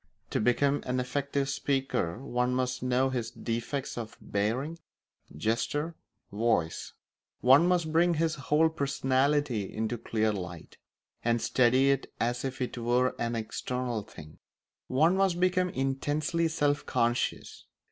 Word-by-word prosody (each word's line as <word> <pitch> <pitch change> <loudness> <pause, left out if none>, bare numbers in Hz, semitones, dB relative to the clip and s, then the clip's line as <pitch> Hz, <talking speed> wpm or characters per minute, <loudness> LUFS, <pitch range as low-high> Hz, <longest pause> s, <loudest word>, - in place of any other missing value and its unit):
To - - +1
become 140 +5 +2
an 125 0 0
effective 140 +2 -1
speaker 135 -10 -1
one 125 -1 0
must 125 0 -1
know 130 +1 +1
his 120 -3 -2
defects 120 +3 -3
of 110 -2 -7
bearing, 125 +11 -2 0.6
gesture, 115 - -1 0.4
voice; 105 -6 0 0.5
one 135 +7 +6
must 175 -3 +1
bring 170 +1 +4
his 160 0 +1
whole 150 +3 +2
personality 140 -5 0
into 110 +2 -2
clear 110 -1 0
light, 90 -4 -7 0.5
and 120 0 +2
study 130 +3 +3
it 135 -1 -1
as 120 +2 0
if 130 -1 -4
it 125 - -5
were 125 +2 +2
an 120 0 -1
external 120 +1 -3
thing; 75 -6 -13 0.5
one 160 +8 +3
must 190 -3 +2
become 185 0 +2
intensely 145 +4 0
self 145 -2 +1
conscious. 120 +1 -1
130 Hz, 130 wpm, -29 LUFS, 120-145 Hz, 0.6 s, one